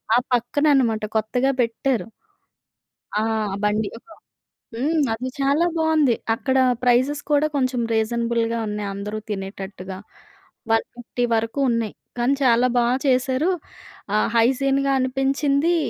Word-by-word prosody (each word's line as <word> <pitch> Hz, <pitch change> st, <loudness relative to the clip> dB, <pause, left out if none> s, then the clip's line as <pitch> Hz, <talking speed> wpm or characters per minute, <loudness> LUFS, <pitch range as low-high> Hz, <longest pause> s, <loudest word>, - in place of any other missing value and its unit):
ఆ -, -, +6 dB, 0.2 s
పక్కననమాట 245 Hz, -2 st, +2 dB
కొత్తగా 250 Hz, +5 st, +1 dB
పెట్టారు. 230 Hz, -2 st, -1 dB, 1.1 s
ఆ! -, -, +1 dB, 0.4 s
బండి. 210 Hz, 0 st, +1 dB, 0.9 s
హ్మ్. 300 Hz, +7 st, 0 dB
అది 250 Hz, +3 st, -4 dB
చాలా 280 Hz, +5 st, +2 dB
బాగుంది. 315 Hz, -6 st, +3 dB, 0.2 s
అక్కడ 265 Hz, +3 st, 0 dB, 0.3 s
ప్రైజెస్ 255 Hz, +4 st, +2 dB
కూడా 295 Hz, +1 st, +4 dB
కొంచెం 255 Hz, -3 st, 0 dB
రీజనబుల్‌గా 230 Hz, +1 st, 0 dB
ఉన్నాయి 210 Hz, -1 st, -3 dB
అందరూ 205 Hz, +2 st, -5 dB
తినేటట్టుగా. 195 Hz, -1 st, -6 dB, 0.7 s
150 240 Hz, +2 st, -2 dB
వరకు 225 Hz, +4 st, -1 dB
ఉన్నాయి. 230 Hz, -2 st, -1 dB, 0.3 s
కానీ 245 Hz, +3 st, +2 dB
చాలా 245 Hz, 0 st, +4 dB
బాగా 240 Hz, +1 st, +2 dB
చేశారు. 260 Hz, +5 st, +2 dB, 0.7 s
ఆహ్, 215 Hz, -, +2 dB
హైజీన్‌గా 275 Hz, +3 st, +2 dB
అనిపించింది. 275 Hz, +5 st, +1 dB
245 Hz, 105 wpm, -22 LUFS, 225-275 Hz, 1.1 s, ఆ